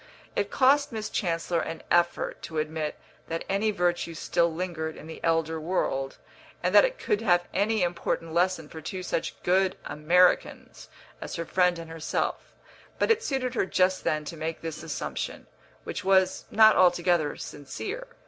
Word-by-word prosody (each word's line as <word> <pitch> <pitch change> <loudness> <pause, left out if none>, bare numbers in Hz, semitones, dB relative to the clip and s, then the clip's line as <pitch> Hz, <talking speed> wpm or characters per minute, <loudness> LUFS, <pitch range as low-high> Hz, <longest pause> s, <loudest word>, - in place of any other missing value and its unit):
It 205 0 0
cost 280 +2 +3
Miss 220 -2 -4
Chancellor 170 -2 0
an 165 - -5
effort 175 0 +1
to 160 - -6
admit 155 0 -2 0.3
that 165 0 -3
any 200 +3 +1
virtue 175 -3 0
still 170 +1 +1
lingered 160 -2 -4
in - - -11
the 160 - -10
elder 165 -1 +1
world, 135 -5 -1 0.5
and - - +1
that - - +8
it - - 0
could 210 - 0
have 175 -5 +2
any 205 +1 +1
important 170 -1 -2
lesson 175 -2 +1
for 160 +1 -9
two 185 +4 -5
such 165 - -3
good 185 +1 +2
Americans 175 +4 +1 0.3
as - - -5
her 170 - -3
friend 180 0 +2
and 165 -1 -8
herself; 165 -1 -3 0.5
but - - +2
it 455 0 +3
suited 265 - -2
her 225 - 0
just 185 0 +2
then 155 0 0
to 165 - -6
make 160 +1 -4
this 160 -2 -5
assumption, 160 -2 -4 0.4
which - - -5
was 190 -1 +3
not 220 0 +6
altogether 175 -4 +3
sincere. 405 - -6
175 Hz, 165 wpm, -27 LUFS, 160-195 Hz, 0.5 s, that